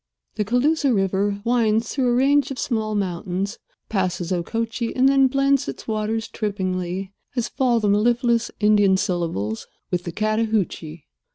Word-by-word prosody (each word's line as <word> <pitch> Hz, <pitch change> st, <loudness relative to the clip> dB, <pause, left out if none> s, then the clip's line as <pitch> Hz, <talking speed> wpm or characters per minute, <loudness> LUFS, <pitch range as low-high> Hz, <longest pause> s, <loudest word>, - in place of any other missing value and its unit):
The 215 Hz, -, -1 dB
Cooloosa 270 Hz, +6 st, +2 dB
River 200 Hz, -1 st, 0 dB
winds 225 Hz, -2 st, +2 dB
through 265 Hz, -3 st, 0 dB
a 240 Hz, -, +2 dB
range 280 Hz, +2 st, +3 dB
of 270 Hz, -, -5 dB
small 220 Hz, -4 st, -1 dB
mountains, 190 Hz, +1 st, -2 dB, 0.3 s
passes 185 Hz, -3 st, -1 dB
Okochee 230 Hz, +6 st, -2 dB
and 260 Hz, +1 st, +4 dB
then 270 Hz, -1 st, +5 dB
blends 275 Hz, +1 st, +2 dB
its -, -, -7 dB
waters 220 Hz, 0 st, -1 dB
trippingly, 190 Hz, -2 st, -3 dB, 0.2 s
as 240 Hz, -3 st, 0 dB
fall 245 Hz, -3 st, +1 dB
the 210 Hz, -, 0 dB
mellifluous 235 Hz, +3 st, +2 dB
Indian 205 Hz, -2 st, +4 dB
syllables, 165 Hz, -, -2 dB, 0.2 s
with 180 Hz, -1 st, 0 dB
the 170 Hz, -, -3 dB
Chattahoochee. 215 Hz, -7 st, -1 dB
215 Hz, 145 wpm, -22 LUFS, 190-240 Hz, 0.3 s, then